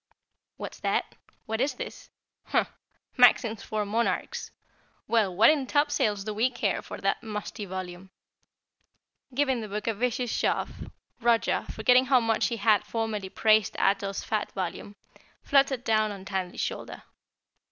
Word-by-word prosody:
'" - - -57
"What's - - -7
that? - - -1 0.3
What's 230 +6 0
this? - - -8 0.4
Humph! - - +1 0.5
Maxims 225 -4 +5
for 215 -1 -2
Monarchs. 235 - -1 0.6
Well, 210 -6 +2
what 225 +9 +7
in 285 -4 -1
topsails 290 -9 +1
do 215 +1 -4
we 225 +5 +2
care 250 - -1
for - - -8
that - - 0
musty 210 -1 -5
volume?" 185 0 -7 1.3
Giving 265 -3 +1
the 215 - -5
book 210 +1 -4
a 225 - +1
vicious 245 +2 -1
shove, - - -2 0.3
Roger, 235 -1 +2
forgetting 250 +4 +4
how 260 -1 +5
much 225 -2 +1
he 235 - -3
had 210 -1 +3
formerly 220 -4 -3
praised 215 0 +3
Ato's 195 0 0
fat 210 -1 -2
volume, 190 +2 -5 0.5
fluttered 275 -3 +3
down 215 -2 +2
on 195 -2 -9
Tandy's 190 -2 -3
shoulder. - - -5
220 Hz, 140 wpm, -27 LUFS, 205-245 Hz, 1.3 s, what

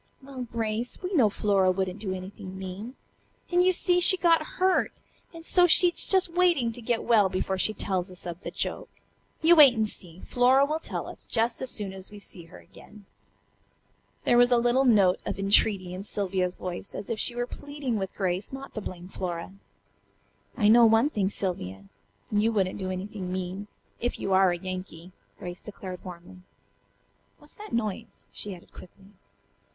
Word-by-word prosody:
"Well, 265 -2 -7
Grace, 225 +1 -2
we 365 +2 -3
know 250 - +4
Flora 200 -2 +2
wouldn't 185 +1 -1
do 200 -2 -4
anything 190 +1 -7
mean. 190 +7 -7 0.6
And, 355 0 +4
you 370 - +5
see, 355 0 +3
she 370 +1 +8
got 335 -2 +4 0.2
hurt, 370 0 +2 0.4
and 330 -1 -10
so 355 0 +5
she's 350 +1 +4
just 375 -3 +2
waiting 345 -10 +2
to 240 +1 -10
get 235 0 -1
well 215 -5 +4
before 190 0 -2
she 215 +3 0
tells 185 -1 -2
us 180 -1 -7
of 175 0 -6
the - - -5
joke. - - -3 0.5
You 340 +2 +7
wait 285 -6 +8
and 220 -1 +1
see. 180 -4 -9
Flora 255 +3 +4
will 305 +2 -2
tell - - -5
us - - -9
just 230 0 0
as 260 - -3
soon 205 -4 -3
as 190 0 -5
we 210 - -12
see 185 -4 -9
her 165 - -14
again." 210 -1 -16 1.2
There 240 - +4
was 245 0 +6
a 245 - +5
little 245 +3 +2
note 200 -7 +4
of - - -4
entreaty 195 -2 +2
in 185 - -6
Sylvia's 190 -3 -2
voice, 180 +1 -6
as 210 - -5
if 220 - -2
she 240 - -1
were 245 0 -1
pleading 285 -3 -5
with 190 -1 -5
Grace 185 0 -2
not 270 +1 -8
to 215 - -5
blame 180 -2 -8
Flora. 180 -1 -5 1.0
"I 210 -5 +3
know 230 +2 +7
one 225 +6 +3
thing, 195 -6 0
Sylvia. 100 - -4 0.5
You 210 +2 +2
wouldn't 195 -4 -1
do 190 -1 -3
anything 185 0 -5
mean, 185 +2 -4 0.3
if 245 - -2
you 195 - -1
are 190 0 +5
a 175 - -2
Yankee," 185 -1 -7 0.3
Grace 175 0 -8
declared 190 -3 -9
warmly. 180 0 -11 1.0
"What's - - -12
that 425 -1 -11
noise?" 225 -1 -4
she 205 -2 -4
added 175 - -18
quickly. 195 +2 -15
205 Hz, 185 wpm, -27 LUFS, 185-245 Hz, 1.2 s, she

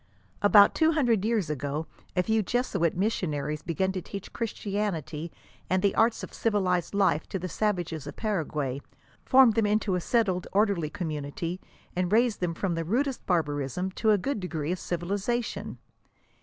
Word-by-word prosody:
"* 95 - -33
About 205 0 +7
two 320 0 +3
hundred 240 -10 +2
years 220 -5 +1
ago 145 +2 -3 0.3
a 180 - +3
few 220 +3 +2
Jesuit 200 -7 0
missionaries 150 -7 -1
began 190 +4 -1
to 190 -1 -4
teach 195 +2 -8
Christianity 195 - -3 0.4
and 185 +1 +1
the 200 - +3
arts 225 +1 +2
of - - -8
civilized 190 -5 0
life 190 -6 +2
to - - -2
the 185 0 -4
savages 175 -6 -2
of - - -7
Paraguay; 150 - -2 0.4
formed 260 -3 +6
them 220 -1 +2
into 210 -1 +1
a 180 - 0
settled, 190 -3 +1
orderly 200 -6 +2
community, 165 0 -4 0.3
and 180 0 0
raised 230 0 +3
them 175 -2 -1
from 185 0 -1
the 165 0 -1
rudest 255 - -1
barbarism, 155 +1 0
to 220 +3 0
a 210 - +6
good 220 +5 -2
degree 165 -4 -3
of 180 - -2
civiliza 200 +7 -1
tion. - - -6
185 Hz, 170 wpm, -28 LUFS, 165-215 Hz, 0.4 s, About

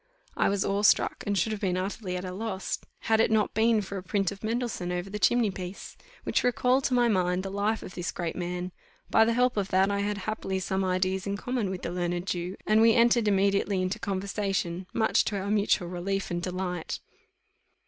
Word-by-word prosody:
I - - +2
was 200 -1 0
awe 200 +1 0
struck, 210 - +3
and 200 0 +1
should 205 +5 +1
have 215 - -4
been 185 -3 0
utterly 185 0 -3
at 180 - -5
a 185 - -4
loss, 195 -1 -3 0.2
had 220 0 +2
it 225 - +4
not 220 -1 +2
been 220 0 +3
for 195 +1 -6
a - - -4
print 195 +1 0
of 200 +1 -10
Mendelssohn 225 -5 -2
over 180 +2 -3
the 210 - -4
chimney 235 -1 +3
piece, 185 0 -7 0.3
which - - +1
recalled 250 +2 +2
to 255 - +2
my 240 -1 +4
mind 185 -3 +1
the 195 - -5
life 205 +3 0
of - - -9
this 175 0 -3
great 170 -2 -4
man; 180 0 -3 0.4
by 225 - +6
the 230 - +2
help 250 -1 +2
of 200 -2 0
that 190 +1 +3
I 200 - 0
had 205 0 -1
happily 200 -1 -3
some 190 +1 -1
ideas 185 +1 0
in 200 0 -1
common 245 -2 -2
with 185 -1 -5
the - - -3
learned 175 0 -2
Jew, 180 0 -3
and 215 +1 +4
we; 225 0 +6
entered 235 -1 +4
immediately 200 0 +2
into 185 +1 -1
conversation, 190 -2 -2
much 220 -1 +2
to 205 - -1
our 200 +2 -3
mutual 205 -3 +2
relief 185 +2 -3
and 175 0 -1
delight. 180 -1 -3
195 Hz, 220 wpm, -28 LUFS, 185-215 Hz, 0.4 s, by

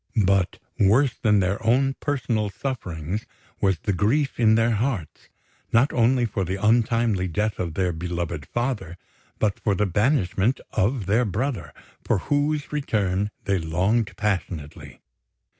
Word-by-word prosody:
But 95 -1 +2 0.2
worse 115 +6 +4
than 105 -3 +2
their 95 +4 -1
own 130 +4 +3
personal 115 -7 -1
sufferings 95 - -4 0.3
was 95 -3 +2
the 100 - -2
grief 130 - +1
in 110 -2 +5
their 115 +1 +3
hearts, 110 - -2 0.4
not 125 +5 +3
only 120 +1 +3
for 100 -3 -2
the 95 +1 -2
untimely 110 -2 +2
death 105 +5 -1
of 85 -4 -3
their 90 -2 +1
beloved 85 -3 -4
father, 120 -8 -3 0.4
but 105 -2 0
for 100 -3 +1
the 105 - +1
banishment 105 - +1
of 110 +1 0
their 110 +6 +3
brother, 105 - -2 0.3
for - - +1
whose 145 +6 -1
return 105 -9 0
they 100 -1 +1
longed 95 +8 0
passionately. 90 -7 -3
105 Hz, 140 wpm, -24 LUFS, 95-120 Hz, 0.4 s, in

